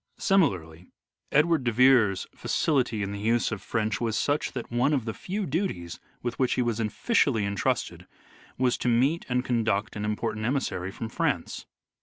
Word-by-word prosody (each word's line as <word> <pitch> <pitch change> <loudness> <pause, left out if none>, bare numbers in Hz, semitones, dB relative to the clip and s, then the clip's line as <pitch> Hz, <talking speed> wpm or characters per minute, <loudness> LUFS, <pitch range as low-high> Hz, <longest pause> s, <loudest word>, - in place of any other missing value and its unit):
Similarly 90 - +1 0.4
Edward 155 0 +3
de 120 - +1
Vere's 120 -5 +4
facility 125 -8 0
hi 100 - -3
the 100 - -5
use 115 +3 +1
of 105 - -4
French 110 -1 -2
was 110 -2 0
such 145 +1 0
that 125 -3 -6
one 125 +5 +2
of 130 -6 0
the 110 - -3
few 195 - -4
duties 130 - -3 0.2
with 120 0 -3
which 130 -2 +2
he 125 - +1
was 115 -2 -1
officially 115 - +1
entrusted 100 -1 -2 0.5
was 125 -1 +1
to - - -2
meet 130 +8 +2
and 125 0 0
conduct 110 -4 0
an 105 - -4
im 105 0 0
portant 110 -1 -3
emissary 115 -7 -1
from 115 +4 -6
France. 110 - -2
120 Hz, 175 wpm, -27 LUFS, 105-135 Hz, 0.5 s, Vere's